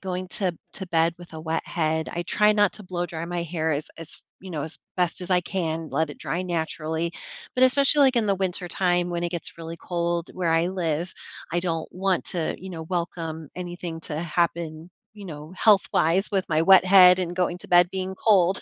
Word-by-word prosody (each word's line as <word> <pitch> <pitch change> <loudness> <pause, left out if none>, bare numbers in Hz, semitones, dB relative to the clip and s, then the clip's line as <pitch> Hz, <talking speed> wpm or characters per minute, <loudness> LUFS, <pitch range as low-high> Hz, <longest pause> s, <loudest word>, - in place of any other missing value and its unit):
going 185 -1 -4
to 180 -3 0 0.2
to 190 - -5
bed 165 -1 +2
with 175 -1 -13
a 160 - -6
wet 160 0 -2
head. 160 -1 -1
I 175 - -3
try 210 +4 +3
not 205 -2 +3
to 215 - -6
blow 180 -1 -3
dry 165 -1 -5
my 175 0 -2
hair 160 -1 -1
as 150 +2 -2
as, 165 -1 -6 0.2
you 190 - -9
know, 155 -4 -3
as 155 - -7 0.2
best 180 -1 +1
as 180 0 -6
I 180 - +4
can, 165 -4 -3
let 160 -1 0
it - - -9
dry 175 - -2
naturally. 165 -1 -2 0.4
But 255 - +5
especially, 275 +3 +4
like, 265 -2 +5
in 230 - +3
the 200 - +3
wintertime 180 -1 0
when 170 0 -2
it 170 - -1
gets 170 -1 -4
really 165 0 -6
cold 170 0 -2
where 180 -2 -2
I 165 +2 +3
live, 175 -1 -2 0.4
I 175 - +1
don't 165 -3 -2
want 190 0 0
to, 170 -3 -1
you 190 +1 -8
know, 165 -2 -6
welcome 165 -2 -4
anything 175 -2 -6
to 150 -1 -4
happen, 170 -1 -1 0.2
you 205 -2 -10
know, 155 -1 -8
health-wise 195 -3 +3
with 190 -2 0
my 160 -1 +2
wet 190 +1 +7
head 185 -1 +8
and 175 -1 -3
going 180 -1 0
to - - -11
bed 175 0 +5
being 190 0 -3
cold. 190 -3 +3
175 Hz, 215 wpm, -25 LUFS, 165-185 Hz, 0.4 s, head